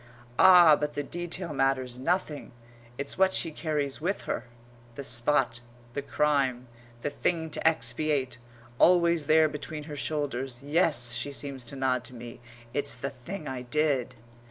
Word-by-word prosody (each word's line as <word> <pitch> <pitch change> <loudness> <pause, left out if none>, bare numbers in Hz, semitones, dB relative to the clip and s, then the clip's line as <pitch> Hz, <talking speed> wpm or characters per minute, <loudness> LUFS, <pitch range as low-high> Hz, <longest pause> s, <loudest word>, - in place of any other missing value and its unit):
Ah, 175 -4 +8
but 150 0 -3
the 145 - -2
detail 175 +2 -4
matters 130 -2 0
nothing! 160 -1 -2 0.4
It's 140 +6 -3
what 190 0 +4
she 165 - 0
carries 150 -3 -2
with 190 +5 -1
her; 120 - -4 0.5
the 140 - -6
spot, 120 -1 +2 0.3
the 140 - -2
crime, 140 -4 0 0.4
the 145 - -1
thing 160 +2 -1
to - - 0
expiate, 130 -2 0 0.4
always 170 -3 +4
there 160 0 +5
between 150 0 -6
her 150 -1 -8
shoulders. 135 -4 -3
"Yes," 145 -5 +2
she 120 +4 -3
seems 140 -2 -5
to 130 - -6
nod 130 -2 0
to 125 - -9
me, 120 0 -10 0.3
"it's 145 +1 +1
the 140 - -4
thing 150 +7 -8
I 130 -1 -4
did." 130 -1 0
145 Hz, 155 wpm, -28 LUFS, 130-155 Hz, 0.5 s, Ah